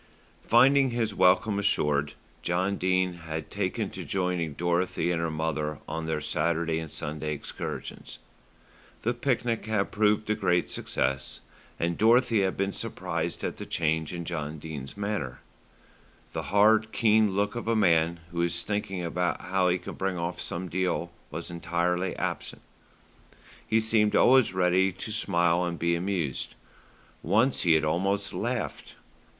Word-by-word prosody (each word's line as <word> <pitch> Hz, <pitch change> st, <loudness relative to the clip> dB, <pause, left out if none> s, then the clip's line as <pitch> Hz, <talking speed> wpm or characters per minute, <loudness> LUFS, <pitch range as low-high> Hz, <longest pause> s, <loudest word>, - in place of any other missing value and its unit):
Finding 135 Hz, +3 st, +5 dB
his 115 Hz, -3 st, -1 dB
welcome 100 Hz, +3 st, +3 dB
assured, 75 Hz, -7 st, +1 dB, 0.3 s
John 90 Hz, +3 st, 0 dB
Dene 95 Hz, 0 st, +1 dB
had 80 Hz, -2 st, -6 dB
taken 100 Hz, +1 st, -2 dB
to 95 Hz, -, -6 dB
joining 90 Hz, -2 st, -1 dB
Dorothy 85 Hz, +1 st, 0 dB
and 85 Hz, -1 st, 0 dB
her 85 Hz, -, 0 dB
mother 75 Hz, -1 st, -2 dB
on 80 Hz, 0 st, -4 dB
their 80 Hz, -1 st, -1 dB
Saturday 85 Hz, 0 st, 0 dB
and 80 Hz, -1 st, -6 dB
Sunday 75 Hz, +1 st, -3 dB
excursions. 75 Hz, -, -6 dB, 0.9 s
The 120 Hz, -, +1 dB
picnic 120 Hz, -4 st, -1 dB
had 110 Hz, -2 st, 0 dB
proved 105 Hz, 0 st, +2 dB
a -, -, +4 dB
great 90 Hz, -5 st, +1 dB
success, 65 Hz, +1 st, -2 dB, 0.4 s
and 85 Hz, 0 st, -1 dB
Dorothy 115 Hz, 0 st, +4 dB
had 95 Hz, -1 st, 0 dB
been 100 Hz, 0 st, 0 dB
surprised -, -, -3 dB
at -, -, -3 dB
the -, -, -6 dB
change 80 Hz, -1 st, 0 dB
in 85 Hz, -1 st, -5 dB
John 80 Hz, -2 st, -4 dB
Dene's 75 Hz, 0 st, -7 dB
manner. 100 Hz, -12 st, -3 dB, 0.9 s
The -, -, -4 dB
hard, 110 Hz, +3 st, +4 dB
keen 110 Hz, -3 st, +3 dB
look 100 Hz, +1 st, +1 dB
of 120 Hz, -1 st, -5 dB
a 115 Hz, -, +2 dB
man 85 Hz, -4 st, +3 dB
who 85 Hz, 0 st, -1 dB
is 85 Hz, 0 st, 0 dB
thinking 100 Hz, -3 st, -2 dB
how 90 Hz, +2 st, 0 dB
he 90 Hz, -, +2 dB
can 90 Hz, -, -8 dB
bring 95 Hz, -1 st, -2 dB
off 85 Hz, +1 st, -3 dB
some 90 Hz, +2 st, -4 dB
deal 90 Hz, 0 st, -1 dB, 0.2 s
was 85 Hz, +3 st, -6 dB
entirely 90 Hz, +2 st, -1 dB
absent. -, -, -4 dB, 1.0 s
He 110 Hz, -, +3 dB
seemed 110 Hz, -1 st, +2 dB
always 130 Hz, -4 st, +5 dB
ready 95 Hz, +1 st, +3 dB
to 95 Hz, +4 st, -6 dB
smile 85 Hz, -4 st, +2 dB
and 85 Hz, -1 st, -2 dB
be 85 Hz, +1 st, +1 dB
amused. 85 Hz, -5 st, -2 dB, 0.7 s
Once 125 Hz, +6 st, +2 dB
he 85 Hz, -3 st, +4 dB
had 80 Hz, -1 st, +3 dB
almost 95 Hz, +5 st, 0 dB
laughed. -, -, -3 dB
90 Hz, 150 wpm, -28 LUFS, 85-105 Hz, 1.0 s, Finding